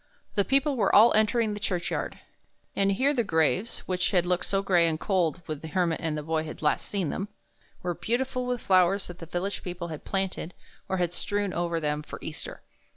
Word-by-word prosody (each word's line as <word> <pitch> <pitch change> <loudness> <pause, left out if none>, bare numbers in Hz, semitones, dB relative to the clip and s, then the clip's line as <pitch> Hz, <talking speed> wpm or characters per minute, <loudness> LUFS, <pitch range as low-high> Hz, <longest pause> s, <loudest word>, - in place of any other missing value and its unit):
The 200 - +3
people 275 +4 +2
were 205 -4 +3
all 225 +3 +8
entering 215 0 +3
the 205 - -5
churchyard; 180 -3 -2 0.6
and 195 0 +3
here 270 +8 +2
the 245 -4 +1
graves, 185 +4 +1
which 180 -1 +1
had 180 -2 +2
looked 180 0 0
so 195 +1 +1
gray 175 -4 +4
and 160 -1 -1
cold 180 -3 0
when 155 -2 -4
the 160 - -8
Hermit 170 0 0
and 160 -2 -1
the 150 - -4
Boy 160 0 0
had 160 0 -8
last 150 - +1
seen 190 -7 -1
them, 195 - -3 0.6
were 175 -1 0
beauti 230 +10 0
ful 255 -1 -3
with 245 -1 -1
flowers 190 +1 +3
that 175 0 -9
the 165 - -8
village 185 +4 -3
people 175 -1 -5
had 155 -2 -7
planted 190 -3 -2 0.3
or 190 - 0
had 175 -1 0
strewn 205 +1 -1
over 170 -1 0
them 150 -1 -1
for 150 - -8
Easter. 155 - -7
180 Hz, 215 wpm, -27 LUFS, 165-205 Hz, 0.6 s, all